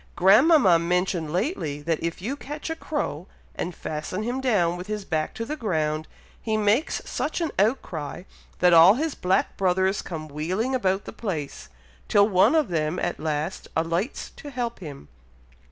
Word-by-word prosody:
Grandmama 200 - +6
mentioned 175 -2 0
lately, 175 - -2
that, 160 0 -1
if 170 +2 -4
you 255 +7 -2
catch 295 +3 -6
a - - -2
crow, 200 - -4 0.3
and 175 - -4
fasten 155 +6 -4
him 245 +4 -2
down 195 -10 +2
with 180 +2 -7
his 210 -2 -4
back 155 -3 -1
to 230 - -4
the 300 - -3
ground, 155 - -1 0.3
he 220 -1 -1
makes 215 +8 +1
such 310 - -2
an 330 -3 -1
outcry, 180 - -1 0.3
that 180 -1 +4
all 170 +5 +8
his 310 +3 -1
black 185 +1 0
brothers 190 +1 +1
come 155 -3 -6
wheeling 180 - -2
about 195 -6 0
the - - -8
place, 160 -10 -5 0.4
till 200 0 +5
one 190 - +4
of 310 -8 +2
them 155 0 -1
at - - -2
last 155 +3 -3
alights 165 - -2
to 290 - -8
help 240 -3 -4
him. 145 - -9
185 Hz, 170 wpm, -25 LUFS, 165-235 Hz, 0.4 s, all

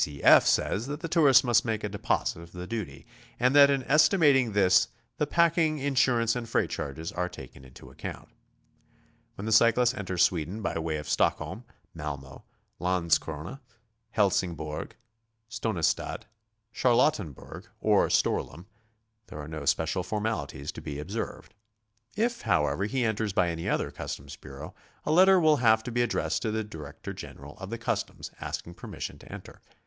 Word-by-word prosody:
C. 70 -2 -5
F. - - +7
says 110 +6 +1
that 145 +2 -5
the 165 - -3
tourist 150 -6 +5
must 120 -3 +3
make 110 -2 -2
a - - 0
deposit 100 -4 -1
of 85 0 -14
the 90 0 -6
duty, 90 -10 -6 0.3
and 125 +3 +3
that 140 -1 +8
in 135 -2 +1
es 150 +4 +5
timating 140 - +3
this 95 -3 +4 0.3
the 150 - +1
packing, 165 -1 +2
insurance 125 -4 +2
and 120 -2 -5
freight - - 0
charges 80 +4 -5
are 90 0 -2
taken 65 - -12
into 65 -1 -14
account. - - -8 1.1
When 100 - -7
the 110 - -2
cyclist 120 +3 +4
enters 95 -4 0
Sweden 90 +5 -1
by 90 - -2
way 80 -1 -2
of 75 +1 -7
Stockholm, - - 0 0.3
Malmo, 70 -3 -7 0.3
Landskrona, 85 - -1 0.5
Helsingborg, 90 - -1 0.5
Stonistad, 110 -7 -1 0.5
Charlottenberg, 115 - 0
or - - +3
Storlim, 85 - 0 0.6
there - - -10
are 75 - -7
no 75 -2 -6
special 80 +6 +1
formalities 90 -8 -3
to - - -9
be 70 - -6
observed. 100 +10 -6 0.6
If, 235 +3 0
however, 85 -2 +1
be 130 +1 0
enters 110 -2 -1
by 90 -2 +2
any 85 0 -3
other - - -1
customs 70 0 -7
bureau, - - -10 0.3
a - - 0
letter 185 +3 +6
will 155 -3 +4
have 110 -3 +4
to 120 - -5
be 120 +1 +1
addressed 120 - 0
to 110 - -1
the 110 0 -1
director 75 -8 -8
general 75 +2 -10
of 95 0 -7
the 115 - -4
customs 115 - -3
asking 85 - -5
permission - - -7
to - - -14
enter. - - -10
105 Hz, 160 wpm, -28 LUFS, 80-125 Hz, 1.1 s, that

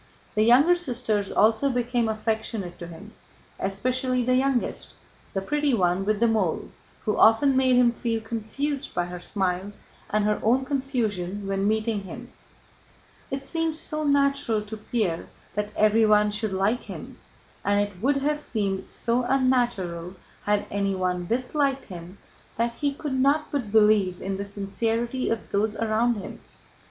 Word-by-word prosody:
The 215 - +1
younger 260 +10 +6
sisters 240 - -1
also 220 +6 +3
became 245 -2 0
affectionate 220 -3 -3
to 170 - -7
him, 175 +6 -11 0.5
especially 255 +6 0
the 255 +1 +2
youngest, 260 -1 0 0.4
the 195 - -1
pretty 295 +2 +1
one 180 -1 +1
with 215 0 +1
the 235 - +4
mole, 215 -7 0 0.3
who 210 - +1
often 260 +5 +5
made 260 -1 +4
him 245 -1 +5
feel 230 -1 -2
confused 250 +6 -4
by 175 - +1
her 175 0 -7
smiles 190 +1 -2 0.3
and 210 0 +1
her 210 0 +1
own 255 +4 +2
confusion 220 -9 -2
when 195 0 0
meeting 220 0 0
him. 240 +6 -9 1.0
It 270 0 -4
seemed 325 0 -1
so 310 -1 -2
natural 280 -6 +2
to 215 +1 -7
Pierre 210 -6 -2 0.3
that 210 0 -2
everyone 215 -1 +4
should 210 0 -2
like 195 +5 +1
him, - - -9 0.4
and 205 0 +2
it 205 -3 -2
would 275 +4 +2
have 300 +1 0
seemed 200 -7 -2
so 240 +1 0
unnatural 240 -10 0 0.3
had 205 0 +1
anyone 185 -3 -1
disliked 270 - 0
him, 180 0 -10 0.4
that 235 +1 0
he 285 +3 -1
could 280 0 -5
not 285 +3 +2
but 250 -8 -2
believe 210 -4 +4
in 195 0 -3
the 200 - -4
sincerity 225 +5 -2
of 225 -1 -3
those 210 +2 +1
around 225 +2 +1
him. 200 - -7
220 Hz, 150 wpm, -25 LUFS, 200-255 Hz, 1.0 s, younger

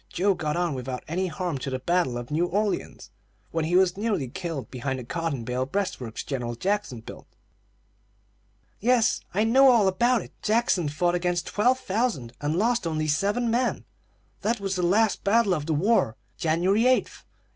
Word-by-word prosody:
Joe 195 +3 +2
got 155 -4 -2
on 175 -3 0
without 130 -1 -5
any 185 +4 -1
harm 170 -3 -3
till 135 +1 -4
the - - 0
battle 135 -2 0
of 120 +3 -7
New 165 +4 +1
Orleans, 205 +3 -2 0.4
when 165 -1 -1
he 175 +3 0
was 185 -1 +4
nearly 205 - -1
killed 165 - -5
behind 130 +1 -3
the 125 - -6
cotton 155 -1 -3
bale 125 +2 -2
breastworks 135 - -3
General 120 -4 -3
Jackson 190 - -2
built." - - -11 1.5
"Yes, 235 0 +2
I 210 - +3
know 265 +4 +6
all 230 -6 +5
about 235 +5 +2
it. - - -14
Jackson 210 -7 +1
fought 175 +4 0
against 175 -1 0
twelve 245 +6 +2
thousand, 195 - -2
and 145 +2 -1
lost 230 0 +1
only 155 -1 -1
seven 205 +10 +1
men. 245 +1 0 0.6
That 225 +3 0
was 195 -1 -2
the 180 - -1
last 205 +5 +2
battle 205 -1 +3
of 150 -3 -3
the 160 - +1
war, 175 - +2 0.2
January 185 +8 +2
8, 255 0 +4
1815. - - -16
180 Hz, 180 wpm, -26 LUFS, 145-210 Hz, 1.5 s, know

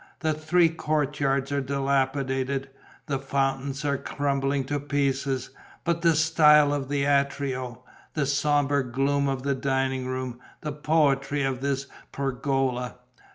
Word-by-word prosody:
The 160 -2 +1
three 165 +3 +3
courtyards 145 -3 0
are 140 0 +1
dilapidated, 135 0 -1 0.3
the 140 -2 -2
fountains 135 +1 -1
are 140 -1 0
crumbling 140 -1 -1
to 145 +2 -2
pieces... 140 -2 -1 0.3
but 170 -1 0
the 165 -2 +4
style 150 -2 +5
of 140 -2 -3
the 145 -1 0
atrio, 140 -3 0 0.3
the 150 -3 +1
sombre 145 0 +2
gloom 140 +2 +1
of 135 -1 -2
the 140 0 +1
dining 135 -1 -1
room, 130 -1 -4 0.2
the 150 - -3
poetry 145 -2 +1
of 130 -1 -1
this 140 0 -1 0.3
pergola!... 135 -2 -1
140 Hz, 130 wpm, -26 LUFS, 135-145 Hz, 0.3 s, style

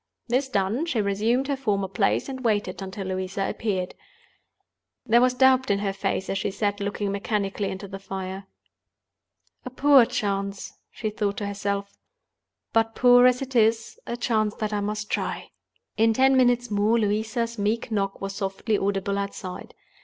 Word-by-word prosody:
This 260 +3 0
done, 215 - 0
she 255 -9 0
resumed 215 +6 +1
her 285 - 0
former 205 -7 -1
place, 195 +1 0
and 260 -1 -6
waited 205 -5 0
until 190 +1 -6
Louisa 185 +1 -2
appeared. 190 -5 -2 1.1
There 235 0 +5
was 250 0 +3
doubt 260 0 +4
in 200 - +3
her 200 -1 -2
face 195 -1 -2
as 195 - -1
she - - -1
sat 205 +1 -1
looking 200 0 -2
mechanically 200 0 -2
into 190 +1 -6
the 195 0 -8
fire. 190 0 -6 1.2
"A - - -6
poor 270 0 +6
chance," 200 -5 -3 0.2
she 215 -2 -4
thought 205 -2 -2
to 205 - -3
herself; 200 0 -3 0.8
"but, 225 0 +2
poor 245 0 +7
as 250 +1 +2
it 265 -1 -9
is, 225 0 +2
a 235 - -3
chance 220 -3 0
that 215 -1 -3
I 205 - 0
must 210 +1 -3
try." - - -3 0.5
In 225 +1 +4
ten 265 +3 +4
minutes 245 -2 +3
more, 210 +3 +2
Louisa's 220 +2 -1
meek 220 +3 -1
knock 195 -2 -1
was 195 0 -4
softly 195 +2 -1
audible 200 0 -1
outside. 200 -2 -6
210 Hz, 165 wpm, -25 LUFS, 195-235 Hz, 1.2 s, poor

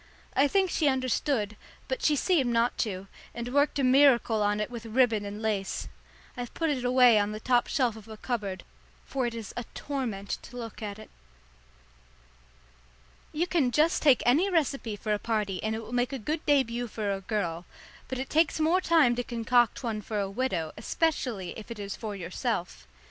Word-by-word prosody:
I 280 - +5
think 380 +3 +2
she 310 - +1
understood, 255 -4 0 0.3
but - - -3
she 300 - +3
seemed 290 -4 +2
not 235 +1 +2
to, 195 -4 -2 0.3
and 235 +1 -5
worked 285 +1 +3
a 275 - +1
miracle 255 -4 +5
on 205 0 +1
it 210 +3 -2
with 230 -1 -7
ribbon 225 -3 +2
and 205 +2 -6
lace. 205 -3 -2 0.5
I've 245 -2 -6
put 325 -2 0
it 260 -4 -2
away 250 -3 +6
on 205 +1 0
the 215 - -5
top 245 +1 +2
shelf 250 -7 +1
of 220 -1 -12
a 220 -1 -9
cupboard, 210 -6 -3 0.4
for 260 -3 -1
it 235 - -5
is 225 -3 -7
a 240 - -3
torment 235 -9 -3
to 245 - -11
look 230 -2 -7
at 205 -1 -5
it. 215 - -13 2.2
You 325 +3 0
can 330 -8 +1
just 305 +6 +2
take 280 -5 +5
any 310 +11 +4
recipe 275 - 0
for 210 +1 -2
a 205 - -1
party 210 -5 -1
and 220 0 -1
it 225 - -5
will 225 - -9
make 245 +1 +1
a - - -1
good 305 +7 -3
début 245 -4 +2
for 210 -2 -2
a 195 - -4
girl, 180 -4 -2 0.4
but 260 - -4
it 265 +1 -3
takes 320 +1 +2
more 330 +4 +3
time 315 -9 +4
to 245 - 0
concoct 240 +1 +1
one 220 -3 -2
for 210 +1 -3
a 195 -1 -2
widow, 195 -9 -1
especially 230 - -1
if 220 - -11
it 235 - -6
is 200 -1 -5
for 215 -3 -5
yourself. 180 - -3
235 Hz, 195 wpm, -28 LUFS, 210-270 Hz, 2.2 s, away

